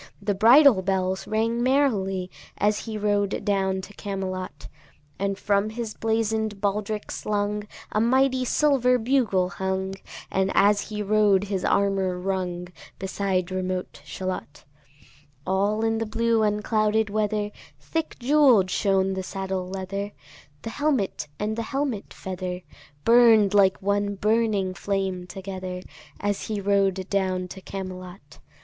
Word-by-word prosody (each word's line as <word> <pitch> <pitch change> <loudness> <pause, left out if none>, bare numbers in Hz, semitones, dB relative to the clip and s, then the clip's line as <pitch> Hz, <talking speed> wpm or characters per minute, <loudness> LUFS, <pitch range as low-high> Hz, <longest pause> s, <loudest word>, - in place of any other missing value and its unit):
The 205 - -1
bridle 235 +2 +7
bells 190 0 -1
rang 230 +2 0
merrily 205 -9 +1 0.3
As 210 0 +1
he 220 -2 -4
rode 205 -1 0
down 190 -2 +1
to 195 +2 -11
Camelot: 190 -2 -5 0.5
And 195 0 -1
from 200 +1 +1
his 220 -1 -5
blazon'd 220 -2 -1
baldric 210 +1 -2
slung 210 0 -2 0.2
A 215 - +1
mighty 260 +2 +3
silver 250 -2 +3
bugle 225 -7 +1
hung, 190 +1 -2 0.4
And 190 0 +1
as 205 +1 +3
he 210 -1 -3
rode 205 -2 +3
his 195 -3 -3
armour 195 -2 +1
rung, 180 -1 -3 0.3
Beside 190 -1 -1
remote 185 0 -3
Shalott. 185 -6 -6 0.8
All 200 +3 +1
in 225 0 +1
the 225 - -2
blue 230 0 +1
unclouded 215 0 +1
weather 210 0 0 0.3
Thick 325 -1 -3
jewell'd 250 -8 +4
shone 195 -1 +2
the 190 - -3
saddle 190 -1 -4
leather, 195 +2 -4 0.5
The 225 - -5
helmet 265 - -1
and 215 +1 -2
the 230 - -2
helmet 270 -7 -2
feather 185 -1 -5 0.4
Burn'd 230 -4 +6
like 195 -2 +5
one 200 0 0
burning 210 -2 +1
flame 190 -2 -2
together, 185 -1 -6 0.4
As 205 -1 -2
he 215 -2 -2
rode 195 -1 +1
down 185 -2 0
to 190 - -9
Camelot. 185 -1 -8
200 Hz, 130 wpm, -25 LUFS, 190-220 Hz, 0.8 s, bridle